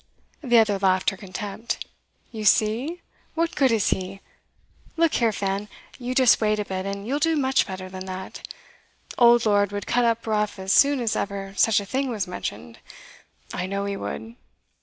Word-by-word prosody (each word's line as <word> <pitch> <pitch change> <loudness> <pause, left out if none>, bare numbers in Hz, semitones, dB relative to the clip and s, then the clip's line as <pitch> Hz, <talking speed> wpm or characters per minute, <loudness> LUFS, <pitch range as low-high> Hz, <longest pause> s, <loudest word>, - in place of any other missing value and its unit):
The 240 -3 +4
other 210 -3 +3
laughed 190 +1 +2
her - - -8
contempt. 200 +3 -5 0.5
'You 220 -2 -6
see! 235 - +2 0.3
What 330 0 0
good 270 -4 +3
is 220 -3 +2
he? 190 +1 -3 0.8
Look 330 -1 +3
here, 230 -2 +2
Fan, 200 0 -2 0.3
you 250 0 -4
just 255 -3 +5
wait 215 -1 +2
a 210 - -2
bit, 190 0 -4
and 200 0 -5
you'll 275 +5 -1
do 325 +1 +2
much 265 -2 +2
better 185 -1 -6
than 185 0 -8
that. 185 0 -7 0.8
Old 240 -1 +6
Lord 205 -2 +3
would 205 -1 -4
cut 245 - +1
up 230 0 0
rough 210 -2 0
as 190 0 -1
soon 280 -2 +5
as 225 -2 0
ever 195 -1 -4
such 220 +1 +4
a 200 - -6
thing 265 +6 -1
was 215 -6 -2
mentioned; 115 - -6 0.7
I 180 - -3
know 200 +1 -2
he 200 0 -2
would. 225 +3 -6
210 Hz, 180 wpm, -24 LUFS, 195-240 Hz, 0.8 s, Old